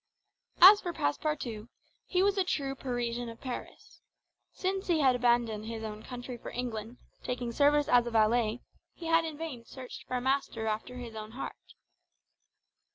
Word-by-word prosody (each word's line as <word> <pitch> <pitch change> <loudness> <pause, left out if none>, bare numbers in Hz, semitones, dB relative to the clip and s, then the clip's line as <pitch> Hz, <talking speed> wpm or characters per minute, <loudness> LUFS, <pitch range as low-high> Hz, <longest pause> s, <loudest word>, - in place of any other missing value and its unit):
As 405 +2 +11
for 350 - -3
Passepartout, 230 - -2 0.4
he 365 0 +2
was 400 0 +3
a 385 - +2
true 280 -6 -1
Parisian 245 -2 -3
of 230 - -10
Paris. 255 -2 -8 0.5
Since 385 +1 -2
he 335 -4 +3
had 260 -3 +5
abandoned 235 -3 +1
his 225 -1 -5
own 215 -1 -6
country 245 +1 -7
for - - -7
England, 235 -1 -5 0.3
taking 245 -1 -3
service 290 +3 +3
as 245 -1 +4
a - - 0
valet, 225 +1 +2 0.3
he 340 - -9
had 330 0 +3
in 315 -2 -5
vain 300 -7 -6
searched 255 +1 -10
for 255 - -1
a - - -2
master 265 -3 0
after 220 +3 -3
his 240 -2 -7
own 215 0 -7
heart. - - -8
245 Hz, 165 wpm, -30 LUFS, 230-290 Hz, 0.5 s, As